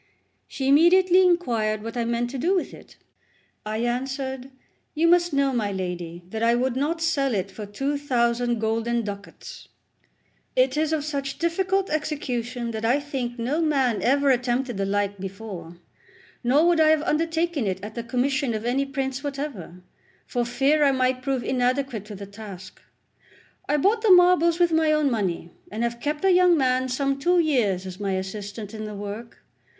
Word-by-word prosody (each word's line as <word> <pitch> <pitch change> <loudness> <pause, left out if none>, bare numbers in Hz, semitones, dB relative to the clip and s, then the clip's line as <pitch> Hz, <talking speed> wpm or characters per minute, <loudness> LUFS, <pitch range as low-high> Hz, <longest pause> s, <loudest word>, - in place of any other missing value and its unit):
She 265 - -4
immediately 355 +6 +5
inquired 230 - +1
what 230 +1 -6
I 235 -1 -1
meant 235 +1 -1
to 270 - -5
do 355 +9 +2
with 365 - -2
it. - - -14 0.7
I 215 +2 -2
answered: 265 +1 -3 0.5
"You 325 +2 +3
must 350 0 +4
know 280 -1 +1
my 215 -4 -1
lady, 180 -2 -5
that 220 - -4
I 230 +1 +3
would 250 0 0
not 310 +5 -1
sell 275 -6 +1
it 195 0 -2
for 210 +1 -8
two 275 +8 -2
thousand 240 -3 +1
golden 225 +2 -1
ducats; 200 -1 -9 0.9
it - - +3
is 310 0 0
of 305 -2 -1
such 280 -2 -3
difficult 375 +3 0
execution 250 -6 -3
that 220 0 -5
I 245 +5 +3
think 265 -4 -4
no 260 +8 -1
man 270 -8 +1
ever 280 +2 +3
attempted 245 -1 0
the 195 0 -1
like 200 0 -1
before; 190 -3 -8 0.7
nor 275 +7 +4
would 345 -1 +3
I 310 -1 +5
have 310 -1 +3
undertaken 325 -4 0
it 190 -1 -2
at 210 +1 -7
the 235 - -4
commission 255 +1 0
of 215 +1 -4
any 270 +3 0
prince 270 -1 -3
whatever, 275 - -6 0.4
for 245 -1 -1
fear 275 +5 +2
I 280 - +5
might 255 -1 0
prove 260 -1 -1
inadequate 250 -3 -1
to 210 -1 -9
the 200 +1 -8
task. 200 -3 -11 0.9
I 295 - +3
bought 410 +9 +2
the 440 - +2
marbles 355 -2 +6
with 345 -1 +3
my 320 -1 +3
own 305 -3 +2
money, 185 -6 -2 0.2
and 220 +3 -3
have 235 0 -2
kept 295 +7 -2
a 385 - +5
young 360 -1 +5
man 255 -1 +1
some 275 +2 -1
two 355 +6 +2
years 240 - +1
as 185 0 -8
my 200 -2 -1
assistant 205 +2 -5
in 215 -1 -6
the 210 -1 -6
work. 205 +3 -8
255 Hz, 180 wpm, -24 LUFS, 220-300 Hz, 0.9 s, marbles